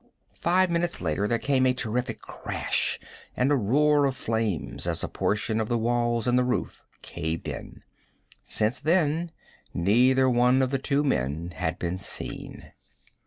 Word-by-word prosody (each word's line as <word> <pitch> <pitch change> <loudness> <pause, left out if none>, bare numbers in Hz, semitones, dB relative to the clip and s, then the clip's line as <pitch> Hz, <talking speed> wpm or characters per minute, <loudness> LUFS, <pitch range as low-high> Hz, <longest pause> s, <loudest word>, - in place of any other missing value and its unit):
Five 180 +1 +2
minutes 170 0 0
later 105 - -1
there 115 - +1
came 130 +1 +2
a 125 - +2
terrific 125 0 -2
crash, - - -1 0.4
and 130 +3 +2
a - - +5
roar 145 +5 +3
of 135 -1 0
flames 110 -7 -2
as - - -1
a - - -1
portion 110 +2 -1
of 110 - -3
the 120 - +1
walls 120 0 0
and 125 0 +3
the - - +3
roof 125 0 -2 0.2
caved 80 +1 -4
in. - - -7 0.6
Since 110 +5 0
then 165 0 +1 0.5
neither 125 +8 +4
one 125 +1 +4
of 130 - -1
the 135 - 0
two 140 +2 +1
men 80 - -1
had 80 -3 -2
been 90 +1 -3
seen. 100 - -5
125 Hz, 160 wpm, -26 LUFS, 110-140 Hz, 0.6 s, a